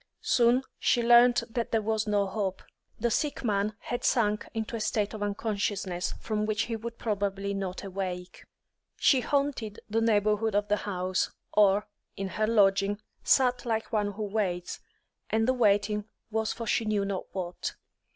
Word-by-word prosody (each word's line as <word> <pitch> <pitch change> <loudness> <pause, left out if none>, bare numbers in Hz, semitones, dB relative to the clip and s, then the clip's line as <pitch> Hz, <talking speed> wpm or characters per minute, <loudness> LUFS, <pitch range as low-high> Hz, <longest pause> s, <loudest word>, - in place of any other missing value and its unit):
Soon, 245 +2 +4 0.2
she 240 - +2
learnt 240 0 +6
that 235 0 -3
there 225 - +2
was 220 0 0
no 205 -1 +2
hope; 195 -1 -3 0.4
the 235 +1 +1
sick 290 +4 -1
man 210 -1 0
had 245 - -4
sunk 210 -4 +2
into 225 +1 -3
a - - -3
state 210 0 0
of 215 - -6
unconsciousness 200 -3 -2
from 215 -1 -2
which 215 +1 +1
he 230 - -3
would 230 +1 -6
probably 200 -2 -2
not 190 -1 -4
awake. 185 -2 -5 0.5
She 265 -3 +4
haunted 275 -7 -1
the 225 +1 0
neighbourhood 215 -1 +2
of 205 0 +1
the 210 - +3
house, 185 -1 0 0.2
or, 205 0 +4 0.3
in 195 -1 -3
her 215 +3 0
lodging, 200 -2 +3 0.2
sat 250 -2 +3
like 225 -1 -2
one 205 -1 +1
who 215 +2 -4
waits, 195 -4 -2 0.5
and 225 +1 +1
the 260 - +4
waiting 210 -3 +2 0.3
was 220 0 0
for 230 - -5
she 225 - +1
knew 210 -2 0
not 195 -1 -3
what. 180 -2 -4
210 Hz, 165 wpm, -28 LUFS, 200-225 Hz, 0.5 s, learnt